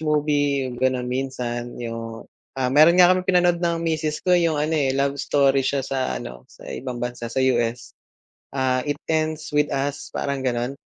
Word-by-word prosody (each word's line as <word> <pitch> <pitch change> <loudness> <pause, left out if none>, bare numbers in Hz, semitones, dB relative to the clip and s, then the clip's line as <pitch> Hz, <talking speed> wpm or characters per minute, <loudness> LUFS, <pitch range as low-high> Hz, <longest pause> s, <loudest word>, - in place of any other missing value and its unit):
movie 145 -3 +1
ganun, 130 -1 +1
minsan, 125 -2 -3
yung 115 -1 -6 0.3
ah, 130 -1 0
meron 155 +5 +6
nga 180 0 +7
kaming 185 0 -2
pinanood 175 -1 +3
ng 170 -1 +1
misis 155 -2 -1
ko 180 - +3
yung, 170 -3 +3
ano, 150 +2 0
eh, 135 -4 +1
love 140 0 0
story 140 -1 +3
siya 135 0 -1
sa 135 -1 -2
ano, - - -9
sa - - -16
ibang 125 -1 -5
bansa, 120 -1 -4
sa 115 - -11 0.2
U.S. 120 0 -2 0.6
Ah, 130 -1 +1
"It 145 - 0 0.2
Ends 155 0 -1
With 150 0 +2
Us," 140 +1 -3
parang 140 -2 -2
gano'n? 125 +2 -2
140 Hz, 175 wpm, -23 LUFS, 125-155 Hz, 0.6 s, nga